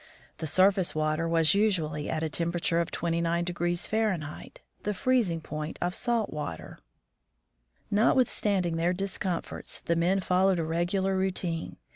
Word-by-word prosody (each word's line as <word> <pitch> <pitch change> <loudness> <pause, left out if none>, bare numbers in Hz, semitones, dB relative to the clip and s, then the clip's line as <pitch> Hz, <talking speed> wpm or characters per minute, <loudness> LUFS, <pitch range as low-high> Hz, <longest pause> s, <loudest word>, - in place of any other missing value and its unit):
The 160 - -3
surface 185 +2 +3
water 155 +2 0
was 165 -1 +4
usually 165 -8 0
at 160 0 -1
a - - +1
temperature 170 +1 0
of 170 - -3
29 170 0 0
F., 175 0 -2 0.9
the 210 - -1
freezing 215 -9 +1
point 155 0 -5
of 175 +1 -1
salt 230 -4 -1
water. 145 - -6 1.1
Notwithstanding 205 -6 +2
their 170 +2 +1
discomforts, 190 -2 -3
the 170 - 0
men 175 +4 +2
followed 185 0 +2
a 165 - 0
regular 175 +4 0
routine. 185 -3 -2
175 Hz, 130 wpm, -28 LUFS, 165-190 Hz, 1.1 s, was